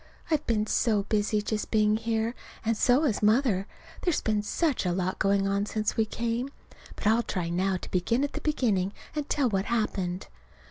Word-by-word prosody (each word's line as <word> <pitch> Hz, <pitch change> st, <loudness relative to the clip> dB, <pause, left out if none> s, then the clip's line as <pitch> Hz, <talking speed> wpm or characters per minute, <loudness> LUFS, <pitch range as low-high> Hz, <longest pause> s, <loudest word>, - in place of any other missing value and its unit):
I've 305 Hz, -1 st, +2 dB
been 215 Hz, -2 st, +1 dB
so 215 Hz, -2 st, +2 dB
busy 210 Hz, 0 st, 0 dB
just 215 Hz, 0 st, -2 dB
being 215 Hz, -1 st, +3 dB
here. 225 Hz, +1 st, -1 dB, 0.3 s
And 230 Hz, +1 st, +2 dB
so 250 Hz, +6 st, +3 dB
has 245 Hz, -9 st, +1 dB
Mother. 210 Hz, -3 st, +3 dB, 0.3 s
There's 350 Hz, -4 st, +1 dB
been 215 Hz, -1 st, +1 dB
such 290 Hz, +6 st, 0 dB
a 180 Hz, -, 0 dB
lot 185 Hz, +1 st, -1 dB
going 195 Hz, 0 st, +2 dB
on 200 Hz, +1 st, 0 dB
since 215 Hz, -1 st, -1 dB
we 220 Hz, -, +2 dB
came. 235 Hz, +4 st, -2 dB, 0.5 s
But -, -, -8 dB
I'll 220 Hz, +3 st, +4 dB
try 180 Hz, -6 st, -3 dB
now 185 Hz, +2 st, +1 dB
to -, -, -9 dB
begin 230 Hz, +9 st, +1 dB
at 285 Hz, -, -2 dB
the -, -, -4 dB
beginning 210 Hz, -10 st, +1 dB, 0.2 s
and 300 Hz, -1 st, -3 dB
tell 280 Hz, -3 st, +2 dB
what 195 Hz, -3 st, 0 dB
happened. 190 Hz, -6 st, -1 dB
215 Hz, 190 wpm, -28 LUFS, 195-235 Hz, 0.5 s, I'll